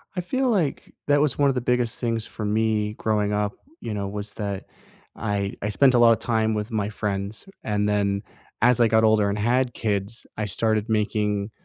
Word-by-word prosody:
I 180 - -1
feel 260 +8 0
like 180 -10 -1
that 145 0 +4
was 150 -3 +1
one 140 -1 +4
of 135 - 0
the 125 - 0
biggest 125 -1 0
things 115 -2 -1
for 110 - -6
me 105 0 +1
growing 105 -2 0
up, 105 0 0 0.3
you 110 - -4
know, 100 -1 -3
was 105 +1 -5
that 100 -2 -4 0.5
I 100 -2 -2
I 105 - -1
spent 130 +6 +4
a 120 - +4
lot 115 -1 +7
of 115 - +2
time 110 -2 +1
with 105 +2 -3
my 105 -2 -1
friends. 105 - -3 0.2
And 105 -1 0
then, 100 -1 0 0.4
as 125 0 +4
I 115 - +5
got 110 0 +3
older 110 -2 +4
and 100 - -1
had 120 +3 +1
kids, 105 +1 -2
I 105 - -1
started 110 +2 0
making 105 -1 0
110 Hz, 205 wpm, -24 LUFS, 105-120 Hz, 0.5 s, lot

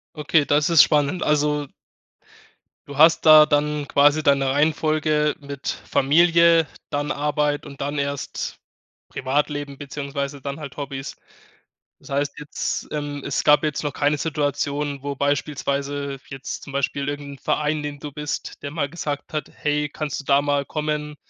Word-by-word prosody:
Okay, 150 0 +2
das 145 +2 +2
ist 165 -3 +8
spannend, 150 +4 +1
also 150 0 +1 1.2
du 140 0 -8
hast 160 +2 +5
da 155 -1 +9
dann 150 -1 0
quasi 145 +2 +4
deine 135 -1 +3
Reihenfolge 150 +1 +1
mit 140 -1 -6
Familie, 170 +2 +4 0.2
dann 145 0 -2
Arbeit 150 0 0
und 140 -2 -11
dann 145 +1 -3
erst 140 0 -3 0.5
Privatleben 145 +1 -2
beziehungsweise 140 0 -5
dann 140 +2 -5
halt 140 -3 -8
Hobbys. 140 -1 -6 0.9
Das - - -14
heißt 140 +1 -1
jetzt, 150 0 -4
es 145 -2 -3
gab 150 +1 +6
jetzt 150 -1 -1
noch 145 - -3
keine 145 0 +1
Situation, 145 -2 -2
wo 140 0 -3
beispielsweise 140 0 -2
jetzt 135 -1 -6
zum 140 - -10
Beispiel 140 +1 -1
irgendein 145 -1 -5
Verein, 150 +2 0
in 150 - -5
den 145 -1 -5
du 145 0 -7
bist, 150 -1 -5
der 140 - -4
mal 145 -3 -2
gesagt 145 -3 -5
hat: 155 - -3
„Hey, 150 0 -1
kannst 145 -1 -4
du - - -11
da 140 0 +3
mal 145 -1 0
kommen 150 -1 -3
145 Hz, 150 wpm, -23 LUFS, 140-150 Hz, 1.2 s, da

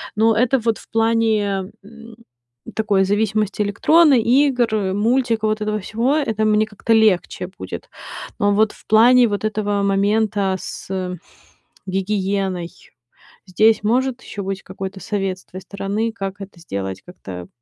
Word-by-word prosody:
Но 220 +1 +3
это 255 +3 +3
вот 230 -1 0
в - - -17
плане, 220 -4 +1
м, 230 +2 -13 0.6
такой 205 -3 +2
зависимости 210 +1 0
электронной, 275 +6 +4
игр, 235 -6 +2
мультика, 225 +1 +1
вот 215 0 0
этого 215 0 -1
всего- 230 +7 -1
это 220 -7 0
мне 215 0 +3
как-то 220 +2 -1
легче 210 -4 +2
будет. 95 - -7 0.5
Но 205 0 +3
вот 215 +1 +2
в - - -20
плане 240 +3 +6
вот 205 -1 -3
этого 205 -1 -1
момента 200 0 +1
с - - -8 1.0
гигиеной- 190 -2 -1 0.8
здесь 215 +4 +3
может 255 +3 0
еще 200 - -7
быть 195 0 -4
какой-то 190 +1 -7
совет 195 -3 -2
с - - -22
твоей 185 - -10
стороны, 200 +3 -3
как 195 -2 -6
это 195 -3 -10
сделать 95 - -5
как-то 90 - -9
210 Hz, 140 wpm, -20 LUFS, 195-225 Hz, 1.0 s, плане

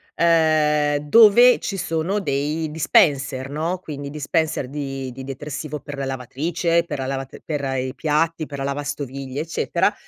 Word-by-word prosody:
uhm, 155 -3 +3
dove 225 +10 +6
ci 195 - -4
sono 165 +4 -1
dei 150 -1 -1
dispenser, 140 -3 +2
no, 165 +5 -2
quindi 145 -5 -7
dispenser 155 -1 -1
di 135 -2 -5
di 130 +2 -9
detersivo 145 +2 -6
per 145 - -8
la 135 - -2
lavatrice, 160 +7 -1
per 145 - -5
la 130 - -2
lav 135 -1 -3 0.2
per 150 -3 -2 0.2
i 130 +1 -3
piatti, 160 +2 0
per 140 -1 -8
la - - -2
lavastoviglie, 140 -1 -4
eccetera. 165 +1 0
150 Hz, 150 wpm, -22 LUFS, 140-165 Hz, 0.2 s, dove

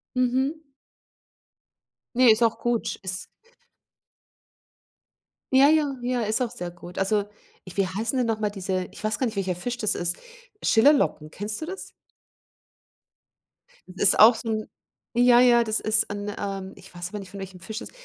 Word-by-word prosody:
Mhm. 260 +5 0 1.5
Ne, 250 -2 +7
ist 225 +2 +3
auch 225 - +1
gut. 240 -1 -1
Ist 185 0 -3 2.3
Ja, 275 +2 +7
ja, 300 -3 +2
ja, 245 0 -1
ist 215 +4 0
auch 240 -2 -1
sehr 175 0 -6
gut. 175 0 -12
Also, 205 +1 +1 0.4
ich 185 +1 -12
wie 195 -2 +2
heißen 220 +7 -2
denn 245 -2 +1
noch 220 -1 -1
mal 210 - +1
diese 190 -2 -3
ich - - -12
weiß 215 0 0
gar 260 - +1
nicht, 225 -2 -3
welcher 185 -2 -1
Fisch 245 +7 -4
das 215 -4 0
ist, 175 0 -1 0.4
Schillerlocken, 225 - +3
kennst 210 +6 -5
du - - -3
das? 380 +3 -7 2.0
Ist 190 - +4
auch 225 +2 +9
so 225 0 -5
'n 215 -1 -3 0.4
ja, 245 0 +5
ja, 240 -1 +6
das 220 -1 0
ist 215 -1 +1
'n, 205 0 -4
ähm 195 -1 -5
ich 185 -1 -15
weiß 175 +1 -6
aber 210 - -6
nicht, 190 -2 -10
von 200 - -8
welchem 190 -1 -8
Fisch 220 +5 -7
ist. - - -9
215 Hz, 170 wpm, -25 LUFS, 195-245 Hz, 2.3 s, auch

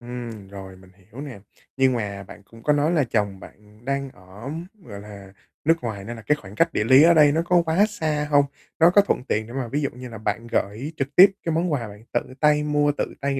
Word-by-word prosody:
Ừm, 120 -4 -8
rồi 95 -1 -10
mình 95 0 -18
hiểu 100 +7 -13
nè. 135 -8 -8 0.4
Nhưng 130 -1 +3
mà 100 -4 -4
bạn 100 +1 -14
cũng 115 +3 -17
có 150 - +3
nói 145 +2 +1
là 160 -4 +2
chồng 105 -5 -1
bạn 105 +4 -17
đang 140 0 -2
ở, 95 +4 -12 0.3
gọi 100 -8 -9
là, 100 -2 -12 0.3
nước 165 +2 +5
ngoài 105 -4 -5
nên 120 +4 -7
là 115 - -10
cái 150 - +1
khoảng 100 +1 -12
cách 165 +7 +2
địa - - 0
lý 130 +6 +7
ở 170 +1 +7
đây 150 -2 +6
nó 160 +3 +1
có 175 -1 +4
quá 165 +6 +3
xa 155 -8 -2
hông? 145 -1 +5 0.3
Nó 165 +1 +7
có 205 +3 +6
thuận 200 - -1
tiện 110 -4 -1
để 120 - -10
mà 130 -2 -3
ví 145 +6 -2
dụ 140 - -1
như 125 +1 -10
là 115 - -9
bạn 110 +2 -3
gởi 115 +11 -2
trực 140 +1 -4
tiếp 195 +2 +9
cái 165 - -1
món 170 +1 0
quà 145 - 0
mà 115 - -6
bạn 105 +1 -13
tự - - -2
tay 150 0 +3
mua, 145 0 +2
tự - - -3
tay 140 -1 -1
125 Hz, 260 wpm, -23 LUFS, 105-150 Hz, 0.4 s, tiếp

